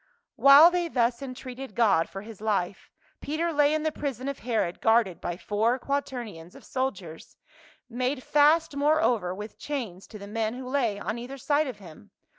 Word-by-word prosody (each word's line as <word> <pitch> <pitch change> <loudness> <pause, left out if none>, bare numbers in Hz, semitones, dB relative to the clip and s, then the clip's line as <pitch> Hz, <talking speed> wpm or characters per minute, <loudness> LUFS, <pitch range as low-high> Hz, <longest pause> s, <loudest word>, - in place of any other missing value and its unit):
While 285 +5 +8
they 350 -1 0
thus 240 -4 0
entreated 255 -2 -8
God 210 -8 +3
for 195 +1 -8
his 215 -2 -11
life, 200 -4 -2 0.3
Peter 325 +3 -2
lay 290 0 +4
in 310 0 0
the 315 - 0
prison 270 -4 -4
of 280 -1 -4
Herod 225 -7 -2
guarded 225 -5 +2
by 175 0 -4
four 220 +6 0
quaternions 240 -11 -5
of - - -14
soldiers, 195 -12 -5 0.5
made 255 +2 -2
fast 300 +1 +3
moreover 280 - +2
with 210 +2 -9
chains 230 -11 -5
to 215 - -10
the 200 - -9
men 220 +2 -2
who 255 0 -7
lay 250 -6 0
on 215 +3 -4
cither 250 +3 -7
side 295 +2 +1
of 250 -5 -6
him. 165 - -14
245 Hz, 175 wpm, -27 LUFS, 210-280 Hz, 0.5 s, While